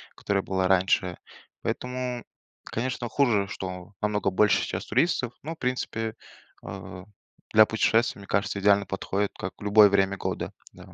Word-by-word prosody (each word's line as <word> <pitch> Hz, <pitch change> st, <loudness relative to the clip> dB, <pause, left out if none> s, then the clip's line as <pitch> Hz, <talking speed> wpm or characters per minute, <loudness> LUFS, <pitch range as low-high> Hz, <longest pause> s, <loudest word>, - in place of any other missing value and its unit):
которая 100 Hz, -1 st, -1 dB
была 95 Hz, -1 st, 0 dB
раньше. 95 Hz, -1 st, +2 dB, 0.5 s
Поэтому, 125 Hz, -1 st, -3 dB, 0.4 s
конечно, 120 Hz, 0 st, -3 dB
хуже, 110 Hz, -6 st, +2 dB
что 90 Hz, 0 st, -7 dB
намного 105 Hz, -2 st, 0 dB
больше 100 Hz, +2 st, +3 dB
сейчас -, -, -4 dB
туристов, 125 Hz, -1 st, +1 dB
но, 160 Hz, +3 st, -5 dB
в -, -, -15 dB
принципе, 115 Hz, -4 st, -2 dB, 0.5 s
э, 90 Hz, -, -8 dB, 0.5 s
для 110 Hz, 0 st, +8 dB
путешествия, 110 Hz, 0 st, +1 dB
мне 100 Hz, -, -12 dB
кажется, 100 Hz, 0 st, 0 dB
идеально 100 Hz, 0 st, +4 dB
подходит, 95 Hz, +1 st, -2 dB
как 90 Hz, -, -6 dB
в -, -, -12 dB
любое 105 Hz, 0 st, +7 dB
время 100 Hz, 0 st, +2 dB
года. -, -, -3 dB, 0.2 s
Да. -, -, -15 dB
105 Hz, 150 wpm, -26 LUFS, 95-120 Hz, 0.5 s, для